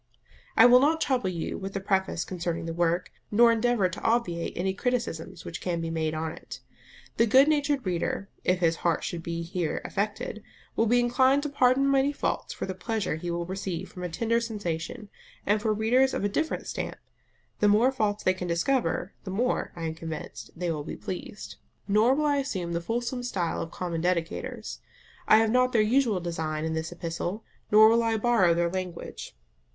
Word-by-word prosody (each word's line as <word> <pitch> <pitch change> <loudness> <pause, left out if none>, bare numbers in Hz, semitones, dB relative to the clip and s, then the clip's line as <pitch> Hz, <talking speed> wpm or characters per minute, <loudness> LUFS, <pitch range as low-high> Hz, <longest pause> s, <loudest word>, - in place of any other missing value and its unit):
I 225 - +9
will 245 +1 +8
not 310 +4 +3
trouble 255 -10 +1
you 170 -3 -4
with 195 0 -6
a - - 0
preface 190 -3 0
concerning 170 -2 -3
the 165 - -3
work, 175 +1 0 0.2
nor 230 +2 +6
endeavour 230 -3 +2
to 180 - -7
obviate 225 -8 0
any 190 +2 0
criticisms 190 -7 -3
which 165 - -6
can 175 -2 -1
be 165 0 -3
made 160 -1 -1
on 160 0 -2
it. - - -10 0.6
The 230 - +4
good 265 +6 +6
natured 290 -4 +1
reader, 185 +2 -2 0.2
if 180 0 +1
his 165 -1 +2
heart 170 -2 0
should 170 - -4
be 170 0 -4
here 170 -1 -2
affected, 210 +1 -3 0.3
will 225 - +2
be 245 +3 +4
inclined 260 +3 +3
to 295 - -2
pardon 275 0 +3
many 275 +1 +3
faults - - -2
for - - -4
the 190 - -4
pleasure 200 -2 -2
he 175 +2 -5
will 170 0 -2
receive 190 -1 -4
from 180 - -9
a 180 - -2
tender 230 +7 0
sensation: 205 -1 -4 0.4
and 210 +1 +2
for 220 0 +1
readers 240 +5 +3
of - - -2
a 205 - +1
different 315 +10 -2
stamp, - - -4 0.6
the 210 - +4
more 220 +6 +5
faults 210 -5 -1
they 185 - +3
can 185 -1 -5
discover, 175 +1 0
the - - -7
more, 235 +7 0
I 170 - -6
am 160 -1 -2
convinced, 160 -8 -7
they 175 0 -2
will 150 -2 -3
be - - -6
pleased. 190 +2 -7 0.3
Nor 215 +6 +4
will 300 +1 0
I 290 -1 +2
assume 185 -11 -2
the 170 - -1
fulsome 240 +6 -2
stile 185 -9 -2
of 165 - -5
common 170 -1 -4
dedicators. 175 -1 -2 0.5
I - - +7
have 225 0 +3
not 255 +1 +3
their 225 - +5
usual 230 -3 +2
design 160 -3 -3
in 160 - -2
this 160 0 -3
epistle, 175 +4 -4 0.3
nor 215 +1 +8
will 230 +1 +4
I 225 -1 +1
borrow 210 -7 +3
their 170 0 +1
language. 185 -2 -6
195 Hz, 200 wpm, -27 LUFS, 170-235 Hz, 0.6 s, I